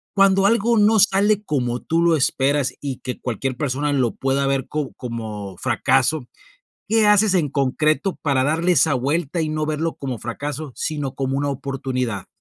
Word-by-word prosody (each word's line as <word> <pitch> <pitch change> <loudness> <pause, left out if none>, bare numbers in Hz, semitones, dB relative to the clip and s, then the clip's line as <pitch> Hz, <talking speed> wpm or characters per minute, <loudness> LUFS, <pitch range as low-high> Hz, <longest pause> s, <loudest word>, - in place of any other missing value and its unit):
cuando 195 -1 +4
algo 230 +2 +3
no 215 +1 +4
sale 205 +1 +3
como 125 - -1
tú 165 +1 0
lo 170 -1 +4
esperas 140 0 +1
y 135 -3 -4
que 125 - -5
cualquier 130 +2 -3
persona 145 +1 -1
lo 130 -5 +1
pueda 135 +1 0
ver 135 -1 -1
co 150 -3 -3
como 110 -5 -6
fracaso, 130 - +1 0.6
¿qué 220 0 +3
haces 210 -1 +4
en 165 -5 +2
concreto 145 +5 0
para 135 -3 +1
darle 165 +5 +1
esa 150 -2 +3
vuelta 145 +6 -1
y 155 - -2
no 155 0 -2
verlo 155 +2 -2
como 130 -4 -5
fracaso, 145 +5 -5
sino 145 -4 -3
como 135 0 -1
una 145 +1 -1
oportunidad? 130 -5 -3
145 Hz, 170 wpm, -21 LUFS, 130-165 Hz, 0.6 s, cuando